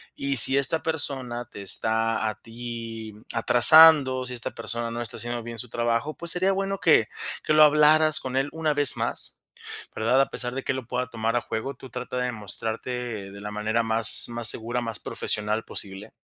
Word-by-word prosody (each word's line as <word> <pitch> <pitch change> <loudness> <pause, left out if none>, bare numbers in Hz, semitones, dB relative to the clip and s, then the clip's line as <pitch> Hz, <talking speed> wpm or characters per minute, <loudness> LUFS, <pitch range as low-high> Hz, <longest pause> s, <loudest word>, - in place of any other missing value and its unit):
Y 140 0 -2
si 135 +4 +7
esta 140 +4 0
persona 135 -6 -4
te 100 - -10
está 110 +2 +1
a 110 - -6
ti 115 -1 -9 0.2
atrasando, 130 +3 +7
si 125 - -6
esta 120 -1 -4
persona 115 0 -5
no 120 +1 -5
está 115 - -1
haciendo 120 +1 -5
bien 115 0 -9
su 125 - -8
trabajo, 120 +6 -2
pues, 170 -1 0
sería 185 +2 0
bueno 195 0 -3
que 150 -9 +3 0.4
que - - 0
lo 155 0 +6
hablaras 150 +1 +4
con 130 0 -7
él 135 +2 -1
una 160 -2 -2
vez 145 -2 +2
más, - - -4 0.6
¿verdad?, 115 +4 +1
a - - -1
pesar 120 -1 -3
de 135 - -5
que - - -2
lo 130 -3 -7
pueda 125 0 -3
tomar 115 0 -3
a 120 - 0
juego, 120 +6 -6
tú 130 +1 -13
trata 125 +1 -6
de 125 0 -2
mostrarte 110 0 -6
de 100 +1 -12
la 105 0 -7
manera 110 +2 -2
más 110 -1 +4
más 120 -1 -1
segura, 120 +2 -2
más 115 -3 -4
profesional 105 +1 -2
posible. 95 +1 -8
120 Hz, 195 wpm, -24 LUFS, 115-135 Hz, 0.6 s, si